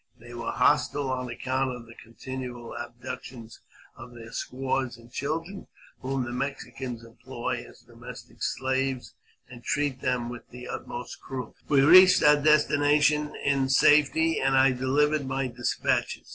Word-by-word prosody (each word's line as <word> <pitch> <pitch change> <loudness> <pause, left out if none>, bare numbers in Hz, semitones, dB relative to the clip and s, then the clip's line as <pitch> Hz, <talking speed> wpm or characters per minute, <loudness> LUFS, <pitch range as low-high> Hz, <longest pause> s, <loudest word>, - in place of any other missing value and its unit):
They 120 +1 -12
were 120 0 -5
hostile 140 -2 +2
on 125 -1 -3
account 130 +1 -2
of 120 -1 -11
the 115 - -14
continual 120 +1 -8
abductions 120 0 -8 0.4
of 120 0 -12
their 115 -1 -11
squaws 130 -1 -3
and 120 0 -17
children, 165 +9 -4 0.3
whom 135 0 -2
the 120 - -5
Mexicans 125 -2 -5
employ 115 - -5
as - - -18
domestic - - -13
slaves, 130 0 -2 0.3
and 120 -1 -13
treat 145 -3 -1
with 120 -1 -3
the 125 0 -10
utmost 120 0 -7
cruelty. 130 -3 -7
We 140 -2 +5
reached 185 +6 +8
our 150 -1 +7
destination 150 0 +3
in 135 -2 +2
safety, 150 +4 +4
and 135 0 +2
I 135 0 +5
delivered 140 +3 +1
my 135 0 -1
despatches. 120 0 -1
130 Hz, 140 wpm, -27 LUFS, 120-145 Hz, 0.4 s, reached